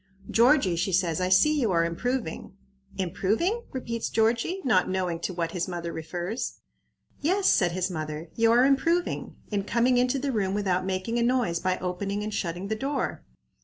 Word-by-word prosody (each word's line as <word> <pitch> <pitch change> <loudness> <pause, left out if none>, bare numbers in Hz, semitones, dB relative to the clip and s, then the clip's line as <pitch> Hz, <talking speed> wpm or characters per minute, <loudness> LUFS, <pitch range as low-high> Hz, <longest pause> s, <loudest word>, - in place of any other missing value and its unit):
"Georgie," 235 - +4
she 180 +3 -1
says, 180 -2 +1
"I 180 - +1
see 295 +12 +4
you 225 -5 +1
are 165 -1 +3
improving." 225 +3 -3 0.4
"Improving?" 215 - 0
repeats 230 -3 -3
Georgie, 230 - +1
not 190 -8 +3
knowing 180 -3 -1
to 180 - -3
what 170 -2 -2
his 175 -1 -2
mother 170 -2 -4
refers. 175 +7 -4 0.6
"Yes," 375 +6 +1
said 175 -4 +3
his 185 +1 -1
mother; 155 0 -5
"you 225 0 +4
are 245 +2 +5
improving, 330 +6 +1 0.2
in 200 -1 0
coming 240 +4 +2
into 250 +2 +2
the 275 +1 -1
room 200 -4 0
without 185 -2 0
making 190 +5 -1
a - - +1
noise 235 -8 +1
by 185 +1 0
opening 195 +3 -3
and 215 0 -4
shutting 180 -1 -3
the 220 - -1
door. 275 +5 -2
200 Hz, 175 wpm, -27 LUFS, 180-245 Hz, 0.6 s, are